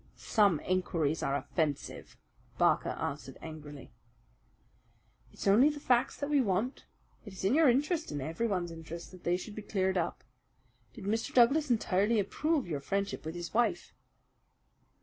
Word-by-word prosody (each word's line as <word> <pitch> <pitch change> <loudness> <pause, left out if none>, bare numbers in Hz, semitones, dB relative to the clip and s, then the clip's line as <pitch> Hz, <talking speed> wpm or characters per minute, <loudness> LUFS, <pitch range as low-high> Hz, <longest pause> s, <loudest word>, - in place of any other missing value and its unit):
"Some 200 -8 +2
inquiries 165 -4 0
are 140 - 0
offensive," 150 -1 -3 0.4
Barker - - +3
answered - - -5
angrily. 150 -4 -9 1.4
"It's - - -8
only 220 +9 +6
the 295 -1 -5
facts 245 -3 +2
that 285 - -3
we 290 -2 +4
want. 215 +4 -1 0.4
It 205 - -10
is 190 - -5
in 200 - +3
your 310 -1 +6
interest 300 +6 +1
and 145 - -3
everyone's 175 +4 -2
interest 165 +1 -8
that 185 -1 -14
they 175 +1 +1
should 205 +3 -8
be 215 - -6
cleared 190 -3 0
up. 165 - -3 0.7
Did 225 - -9
Mr. 225 +3 -1
Douglas 275 +5 +5
entirely 215 -1 +2
approve 290 - 0
your 150 -4 -2
friendship 195 +7 -2
with 160 - -5
his 175 0 -6
wife?" 240 +1 0
195 Hz, 150 wpm, -31 LUFS, 170-240 Hz, 1.4 s, only